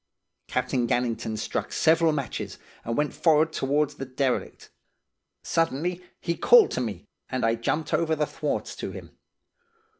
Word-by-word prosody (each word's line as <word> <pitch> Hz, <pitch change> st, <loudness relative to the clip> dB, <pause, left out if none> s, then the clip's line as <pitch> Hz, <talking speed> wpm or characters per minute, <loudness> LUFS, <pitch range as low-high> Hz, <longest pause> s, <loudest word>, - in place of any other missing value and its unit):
"Captain 125 Hz, -1 st, 0 dB
Gannington 115 Hz, -2 st, -1 dB
struck 110 Hz, -, -3 dB
several 165 Hz, 0 st, +4 dB
matches, 140 Hz, -4 st, -4 dB, 0.3 s
and 115 Hz, 0 st, -3 dB
went 150 Hz, 0 st, 0 dB
forrard 160 Hz, -1 st, +3 dB
towards 145 Hz, +2 st, +1 dB
the 135 Hz, -, -6 dB
derelict. 130 Hz, 0 st, -2 dB, 0.7 s
Suddenly 165 Hz, +3 st, 0 dB, 0.2 s
he 170 Hz, -1 st, -2 dB
called 475 Hz, -, +6 dB
to -, -, -1 dB
me, 105 Hz, -7 st, -4 dB, 0.2 s
and 130 Hz, -2 st, -1 dB
I 115 Hz, -, +3 dB
jumped 150 Hz, +7 st, -2 dB
over 160 Hz, -1 st, +2 dB
the 150 Hz, -1 st, +1 dB
thwarts -, -, -3 dB
to -, -, -4 dB
him. -, -, -10 dB
145 Hz, 145 wpm, -26 LUFS, 125-160 Hz, 0.7 s, called